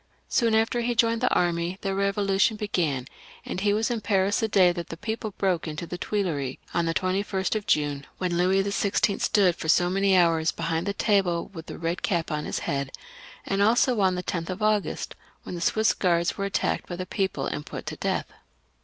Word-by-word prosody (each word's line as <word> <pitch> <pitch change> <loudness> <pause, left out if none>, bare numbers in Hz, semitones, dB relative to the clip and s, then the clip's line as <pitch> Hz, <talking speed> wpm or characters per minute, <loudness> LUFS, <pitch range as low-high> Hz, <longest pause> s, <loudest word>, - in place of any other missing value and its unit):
Soon 230 -3 +2
after 225 +2 +2
he 240 0 -1
joined 230 0 +2
the 250 - +3
army 175 +1 +1
the 195 - -2
Eevolution 200 +2 +1
began, 165 - -1 0.4
and 185 - -4
he 205 0 +2
was 220 +3 +1
in 230 -2 -2
Paris 200 -1 +1
the 225 - +1
day 190 -4 +5
that 175 -1 -6
the 165 - -6
people 220 +3 -3
broke 185 -4 0
into 155 +2 -4
the 175 +1 -6
Tuileries, 160 -12 -2 0.2
on 170 -1 +1
the 165 - +1
21st 190 0 0
of 215 -2 -3
June, 145 -2 0
when 180 -2 -1
Louis 185 +2 +3
XVI. 200 0 0
stood 195 -5 +3
for 160 - -5
so 175 +2 +4
many 195 0 +3
hours 165 -2 +3
behind 165 +2 -2
the 200 - 0
table 195 -5 +1
with 165 -2 -9
the - - -7
red 165 +1 -2
cap 170 -3 -1
on 150 0 -2
his - - -3
head; 140 -1 -2 0.5
and 195 0 0
also 235 +2 +3
on 185 -1 +3
the 180 - -3
10th 170 -1 -3
of 185 +3 -4
August, 215 -2 0 0.3
when - - -7
the 175 - -5
Swiss 220 +5 +3
Guards 170 -2 +1
were 195 - -2
attacked 200 - -1
by 175 - -3
the 185 +1 -4
people 190 -7 -2
and 150 - -3
put - - -8
to - - -4
death. - - -1
185 Hz, 210 wpm, -26 LUFS, 170-205 Hz, 0.5 s, day